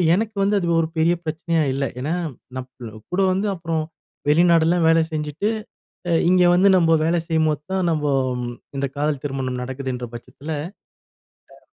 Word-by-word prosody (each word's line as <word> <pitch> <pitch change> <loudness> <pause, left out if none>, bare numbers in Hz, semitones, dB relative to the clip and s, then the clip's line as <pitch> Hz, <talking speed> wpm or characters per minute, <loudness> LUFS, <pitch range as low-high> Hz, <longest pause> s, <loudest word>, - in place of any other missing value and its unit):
எனக்கு 220 +2 -2
வந்து 205 +1 +2
அது 175 - -2
ஒரு 160 - -1
பெரிய 165 +2 +4
பிரச்சனையா 160 +1 0
இல்ல. 135 +1 -1 0.2
ஏனா, 150 +5 -1 0.4
நம்ம 125 -4 -8
கூட 190 +2 +1
வந்து 195 +3 0
அப்புறம் 165 -2 -2 0.5
வெளிநாடெல்லாம் 165 +1 +4
வேல 165 0 +5
செஞ்சுட்டு, 150 +6 -2 0.6
அ - - +2 0.2
இங்கே 180 -1 +5
வந்து 190 +3 +5
நம்ம 165 -1 +4
வேல 170 - +2
செய்யும்போத்தான் 160 +3 0
நம்ம 150 -1 -1 0.7
இந்த 140 - 0
காதல் 145 -2 0
திருமணம் 130 -2 -3
நடக்குதுன்ற 130 -2 -4
பட்சத்துல. 145 +6 -8 1.1
அ. - - -32
160 Hz, 145 wpm, -22 LUFS, 140-175 Hz, 1.1 s, வேல